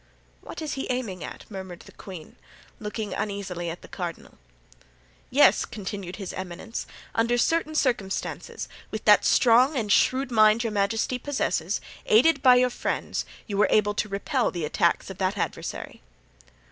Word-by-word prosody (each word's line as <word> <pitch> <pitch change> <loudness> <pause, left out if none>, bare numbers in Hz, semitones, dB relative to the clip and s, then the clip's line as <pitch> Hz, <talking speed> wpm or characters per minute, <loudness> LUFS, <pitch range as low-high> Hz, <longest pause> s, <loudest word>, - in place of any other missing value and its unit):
"What - - -8
is 300 - -3
he 270 - -4
aiming 230 -8 -3
at?" - - -8
murmured 190 -3 -8
the - - -15
queen, 180 -6 -10 0.4
looking 210 -1 -4
uneasily 190 -4 -3
at 165 - -7
the - - -11
cardinal. 175 -3 -7 0.9
"Yes," - - +5
continued 195 -3 -6
his 195 -2 -6
eminence; 185 +4 -6 0.3
"under 230 +2 +2
certain 310 +4 +1
circumstances, 235 -10 -2 0.2
with - - -6
that - - +6
strong 255 +4 +5
and 215 -4 -1
shrewd 255 +3 +3
mind 215 0 +5
your 225 -2 -2
majesty 220 +5 0
possesses, 210 - -1 0.3
aided 280 +6 +5
by 255 -2 +7
your 250 0 +3
friends, - - -2 0.2
you 200 -3 -4
were 210 - +5
able 205 -1 +3
to 210 0 -2
repel 200 0 0
the 170 -3 -3
attacks 170 +5 +1
of 190 - -11
that 190 +2 0
adversary." - - -4
210 Hz, 155 wpm, -26 LUFS, 190-245 Hz, 0.9 s, by